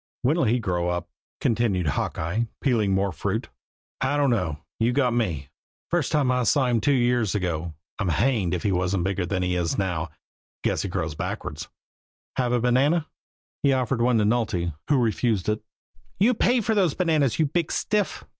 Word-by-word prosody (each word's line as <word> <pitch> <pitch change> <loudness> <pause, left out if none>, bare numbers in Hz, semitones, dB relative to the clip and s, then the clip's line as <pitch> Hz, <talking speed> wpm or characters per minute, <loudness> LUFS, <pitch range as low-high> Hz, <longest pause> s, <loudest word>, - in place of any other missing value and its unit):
"When'll 155 +4 +2
he 120 +2 +3
grow 90 -6 -1
up?" 90 0 -3 0.3
continued 110 -6 +1
Hawkeye, 85 - -1
peeling 115 -7 +1
more 95 0 +1
fruit. 80 - -3 0.5
"I 135 +3 +1
don't 140 -3 +3
know 90 -10 0 0.2
you've 120 +2 +2
got 130 -4 +2
me. 85 - -1 0.4
The 175 - +2
first 155 - -1
time 145 -5 +2
I 125 0 +1
saw 130 +3 +3
him 120 -3 +1
two 145 - +2
years 120 -5 +2
ago, 85 -4 -2 0.2
I'm 95 -4 0
hanged 95 - +1
if 85 - -4
he 100 - +1
wasn't 90 0 0
bigger 95 -1 -1
than 90 0 -1
he 90 0 0
is 85 -2 -1
now 85 -4 -1 0.5
guess - - +1
he - - -3
grows 80 -1 -2
backwards. 75 +1 -5 0.7
Have 125 -2 +1
a 125 - +2
banana?" 135 +7 +2 0.6
He 140 -1 +3
offered 130 -1 0
one 120 0 +3
to 110 - +3
Nulty, 105 -7 0
who 145 - +3
refused 115 -4 +1
it. 105 0 0 0.6
"You 225 +6 +5
pay 245 +2 +2
for 220 +1 0
those 190 -8 +2
bananas, 155 - +2
you 160 - +3
big 165 +3 -1
stiff!" 210 -1 -1
115 Hz, 185 wpm, -25 LUFS, 90-135 Hz, 0.7 s, You